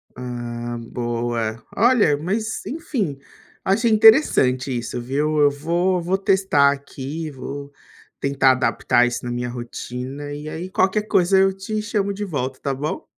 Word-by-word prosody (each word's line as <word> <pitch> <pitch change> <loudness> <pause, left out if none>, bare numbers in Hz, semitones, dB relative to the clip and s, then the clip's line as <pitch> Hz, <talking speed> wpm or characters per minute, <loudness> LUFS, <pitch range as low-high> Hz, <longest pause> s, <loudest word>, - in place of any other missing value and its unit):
Ah, 120 -1 -5
boa. 115 -2 -2
Olha, 220 - +4
mas, 215 +8 -3
enfim, 240 - -3 0.5
achei 225 +5 +2
interessante 210 - +5
isso, 120 +1 -4
viu. 150 +5 0
Eu 145 -1 +6
vou 175 +5 0
vou 180 +3 0
testar 190 -8 +3
aqui, 145 +3 -6
vou 140 +1 -7 0.5
tentar 140 -1 +3
adaptar 125 -1 +2
isso 120 0 -4
na 120 - -3
minha 120 0 -3
rotina, 125 +4 -6
e 150 +1 -7
aí 170 +4 -5
qualquer 190 +2 +1
coisa 190 -1 +3
eu 195 0 +5
te 215 +3 -3
chamo 205 -2 -1
de 205 +1 -5
volta 135 -7 -3
tá 140 -1 -1
bom? 145 +4 -4
145 Hz, 145 wpm, -22 LUFS, 125-190 Hz, 0.5 s, Eu